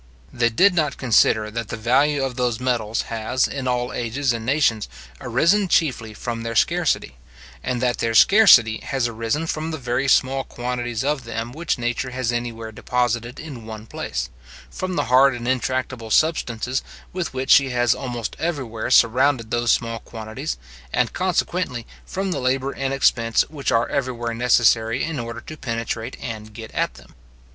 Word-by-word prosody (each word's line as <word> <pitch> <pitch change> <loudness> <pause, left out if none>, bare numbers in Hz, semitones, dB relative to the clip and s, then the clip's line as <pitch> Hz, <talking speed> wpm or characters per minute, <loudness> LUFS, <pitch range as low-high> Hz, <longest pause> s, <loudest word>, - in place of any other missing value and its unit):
They 120 -1 +2
did 185 - +4
not 155 -5 0
consider 110 -3 +3
that 115 -1 -4
the 115 - -5
value 135 +5 +2
of 130 -2 -2
those 125 -3 0
metals 120 -4 -1
has, 115 +3 0
in 135 -2 -4
all 125 0 -1
ages 120 +3 -1
and 115 -1 -4
nations, 125 -4 +1 0.3
arisen 170 - +2
chiefly 125 -11 0
from 115 0 -4
their 115 0 -4
scarcity, 65 -10 +1 0.5
and 125 -1 -2
that 125 -1 +1
their 115 -1 0
scarcity 125 - +7
has 135 -3 -1
arisen 115 +7 -2
from 160 0 -3
the 160 - -3
very 130 0 -1
small 135 0 +3
quantities 120 -1 -3
of 145 -1 -1
them 115 0 -5
which 160 +3 -2
nature 120 +2 -2
has 130 -2 -2
anywhere 115 -2 -4
deposited 120 +1 -1
in 130 -8 -9
one 110 -1 -8
place, - - -4 0.4
from 185 -1 -4
the 145 - +1
hard 130 +2 +5
and 120 0 -6
intractable 130 -2 -2
substances 130 -3 +1 0.3
with 180 -1 -3
which 130 0 -2
she 140 -1 +6
has 120 -2 +2
almost 120 -4 -5
everywhere 130 -10 -3
surrounded 125 0 +3
those 120 -1 +2
small 115 -1 0
quantities, 110 - -6 0.3
and - - +1
consequently 175 -8 -1 0.2
from 190 0 -2
the - - -1
labour 130 +1 0
and 135 -1 -3
expense 115 -4 +2
which 145 -3 -2
are 115 +1 +2
everywhere 120 -4 -2
necessary 115 -1 +3
in 160 -3 -3
order 115 0 -6
to 155 - -9
penetrate, 115 -4 -4
and 110 -3 -7
get 110 -1 -8
at - - -1
them. - - -16
120 Hz, 170 wpm, -22 LUFS, 115-135 Hz, 0.5 s, scarcity